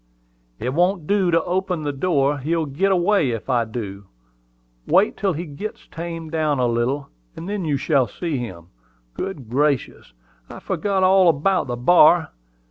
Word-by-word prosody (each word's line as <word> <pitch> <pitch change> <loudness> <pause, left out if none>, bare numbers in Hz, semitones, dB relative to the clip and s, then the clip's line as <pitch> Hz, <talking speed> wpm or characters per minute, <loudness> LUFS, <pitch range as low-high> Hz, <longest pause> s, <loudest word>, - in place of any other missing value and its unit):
"It 125 +3 -3
won't 180 +1 +1
do 195 0 +2
to 165 -1 +2
open 180 -2 -2
the 145 - -1
door: 145 -1 +1
he'll 160 +4 -1
git 155 +8 0
away 185 -4 +2
if 115 +2 -3
I 120 -2 +2
do. 100 -4 -7 0.8
Wait 190 +6 +3
till 195 -3 0
he 165 +3 -5
gits 165 +8 -8
tamed 165 -1 -6
down 155 -3 0
a 125 - +1
little, 120 +4 -1 0.3
and 170 - -8
then 200 -3 -3
you 145 -3 0
shall 135 -4 +1
see 155 - -4
him. 90 -8 -8 0.4
Good 150 - -6
gracious! 135 - -1 0.4
I - - -9
forgot 195 -2 -1
all 185 -1 +5
about 170 +4 +1
the 120 -1 -3
bar! 160 +4 +5
155 Hz, 165 wpm, -21 LUFS, 130-180 Hz, 0.8 s, all